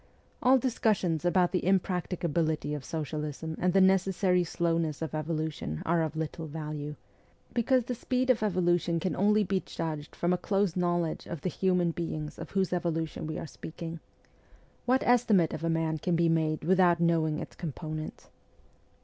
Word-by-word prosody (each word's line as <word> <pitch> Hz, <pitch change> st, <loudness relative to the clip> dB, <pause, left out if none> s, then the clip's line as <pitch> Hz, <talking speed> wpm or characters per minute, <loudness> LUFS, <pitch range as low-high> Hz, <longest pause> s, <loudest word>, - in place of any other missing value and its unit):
All 260 Hz, +1 st, +6 dB
discussions 210 Hz, -, +1 dB
about 175 Hz, 0 st, +3 dB
the 180 Hz, -, 0 dB
impracticability 170 Hz, -4 st, 0 dB
of 145 Hz, -2 st, -4 dB
socialism 155 Hz, +1 st, -4 dB
and 180 Hz, 0 st, +2 dB
the 195 Hz, -, +4 dB
necessary 190 Hz, -1 st, +3 dB
slowness 165 Hz, -3 st, -1 dB
of 160 Hz, -1 st, -4 dB
evolution 155 Hz, -, -3 dB
are 170 Hz, 0 st, +2 dB
of 160 Hz, -1 st, -2 dB
little 160 Hz, +1 st, -4 dB
value, 150 Hz, -1 st, -5 dB, 0.6 s
because 250 Hz, +1 st, +2 dB
the 250 Hz, -, -2 dB
speed 255 Hz, +2 st, +1 dB
of 235 Hz, -, 0 dB
evolution 175 Hz, -4 st, +1 dB
can 180 Hz, +2 st, -1 dB
only 210 Hz, +2 st, +3 dB
be 190 Hz, 0 st, 0 dB
judged 155 Hz, -3 st, -5 dB
from 175 Hz, +1 st, +1 dB
a 180 Hz, -, 0 dB
close 195 Hz, -3 st, +1 dB
knowledge 175 Hz, -2 st, 0 dB
of 170 Hz, -4 st, -6 dB
the 185 Hz, -, -1 dB
human 180 Hz, -2 st, +2 dB
beings 155 Hz, -3 st, -4 dB
of 160 Hz, -, -7 dB
whose 190 Hz, -2 st, 0 dB
evolution 165 Hz, -3 st, -2 dB
we 155 Hz, -, -4 dB
are -, -, -5 dB
speaking. 165 Hz, +1 st, -7 dB, 0.9 s
What 255 Hz, +2 st, +3 dB
estimate 220 Hz, -8 st, +4 dB
of 160 Hz, -, -5 dB
a 165 Hz, -, +1 dB
sum 160 Hz, -1 st, 0 dB
can 175 Hz, +2 st, 0 dB
be 170 Hz, 0 st, +3 dB
made 160 Hz, -1 st, +1 dB
without 180 Hz, 0 st, +4 dB
knowing 165 Hz, -2 st, +2 dB
its -, -, -7 dB
components 155 Hz, -1 st, -6 dB
170 Hz, 165 wpm, -29 LUFS, 160-185 Hz, 0.9 s, All